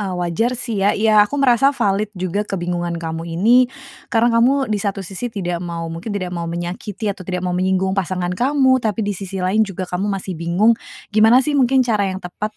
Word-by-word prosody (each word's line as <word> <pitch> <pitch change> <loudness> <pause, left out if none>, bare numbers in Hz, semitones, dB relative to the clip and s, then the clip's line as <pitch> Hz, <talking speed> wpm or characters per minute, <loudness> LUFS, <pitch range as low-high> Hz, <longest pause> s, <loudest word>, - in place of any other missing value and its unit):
eee, 190 -3 -3
wajar 180 +8 -1
sih 225 -5 -2
ya, 200 +1 +2
iya 215 0 +4
aku 210 +7 +2
merasa 270 +1 +3
valid 205 +1 +1
juga 185 +2 -2
kebingungan 175 -3 -3
kamu 165 0 -5
ini, 240 +7 +5 0.4
karena 235 0 +2
kamu 265 +4 +3
di 205 - 0
satu 195 -1 -3
sisi 195 +7 -5
tidak 175 -6 -3
mau 170 -1 -5
mungkin 165 +7 -7
tidak 185 -3 -3
mau 170 -1 -4
menyakiti 185 +5 -4
atau 195 - -19
tidak 180 0 -4
mau 180 - -1
menyinggung 190 +1 +1
pasangan 185 -2 -2
kamu, 260 +3 +2
tapi 220 -1 -1
di 205 - -1
sisi 190 -1 -5
lain 195 +4 +2
juga 195 -3 -1
kamu 180 +3 -3
masih 195 -1 -3
bingung 175 +7 +2 0.4
gimana 225 +4 +5
sih 300 - 0
mungkin 260 -1 +3
cara 210 -4 +1
yang 185 - -4
tepat 210 +3 -6
195 Hz, 205 wpm, -19 LUFS, 180-225 Hz, 0.4 s, ini